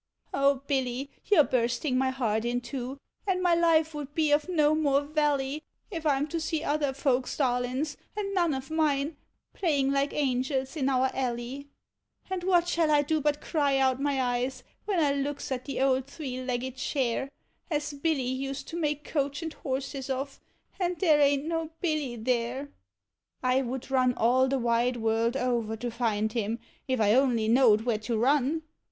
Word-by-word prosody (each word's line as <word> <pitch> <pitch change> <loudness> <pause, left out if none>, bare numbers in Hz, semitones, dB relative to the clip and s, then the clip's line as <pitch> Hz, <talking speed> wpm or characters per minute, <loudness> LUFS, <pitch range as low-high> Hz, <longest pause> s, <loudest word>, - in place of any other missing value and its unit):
0 275 -1 +2
Hilly, 265 0 -1
you 410 -5 +4
're - - +9
bursting 250 +2 0
my 260 +1 +2
heart 225 -5 0
in 240 +1 0
two, 250 +2 -5 0.3
and 375 -2 +1
my 355 -1 +3
life 325 -2 +3
wou't 295 -1 -7
be 310 -2 +2
of 295 +4 +2
no 305 -4 +3
more 285 -3 +2
vally, 290 -1 0 0.3
If 330 -4 -5
1 285 -3 +3
'm 290 +2 -1
to 335 - -2
sec 320 0 -2
other 290 -1 +1
folks1 265 -2 0
darliifs, 255 +2 0 0.2
and 395 -1 -2
none 345 -6 +2
of 265 +2 -6
mine, 300 -1 +1 0.4
playing 285 -7 +1
like 275 +1 +1
angels 265 0 -1
in 275 -3 +1
our 260 0 +2
alley, 255 +2 -3 0.6
And 370 -2 -2
what 350 -2 +3
shall 335 -2 +2
1 295 -1 +4
do 310 +1 0
but 295 0 0
cry 285 -4 +1
out 265 0 +2
my 280 -1 +1
eyes, 250 +1 -1 0.2
when 400 -4 +1
I 295 -3 +3
looks 280 0 -3
at 255 -1 -3
the 275 - -4
old 265 -1 +2
thrre 265 -3 -5
legged 255 +1 -2
chair 265 0 -1 0.4
As 300 -2 -1
Hilly 285 -1 0
used 270 +2 -3
to 335 - -5
make 300 -2 -1
coach 285 +1 -2
and 320 -1 -4
horses 270 0 -4
of, 270 +1 -3 0.4
and 360 -1 0
there 310 -6 +4
a'n't 285 0 +3
no 325 -1 -2
Hilly 305 -8 -1
there! 245 +4 -1 0.7
1 255 0 +2
would 260 +2 -5
run 255 -2 +3
all 255 +3 +3
the 270 +1 +1
wide 240 0 +1
world 225 +2 +1
over 235 -4 -1
to 240 +2 -4
find 220 -2 0
him, 225 -1 -1 0.3
if 260 -2 0
I 210 -1 +4
only 245 -4 +3
knowed 230 -2 +5
where 225 -2 0
to 225 +1 -2
run. 285 +6 +2
275 Hz, 185 wpm, -28 LUFS, 250-300 Hz, 0.7 s, re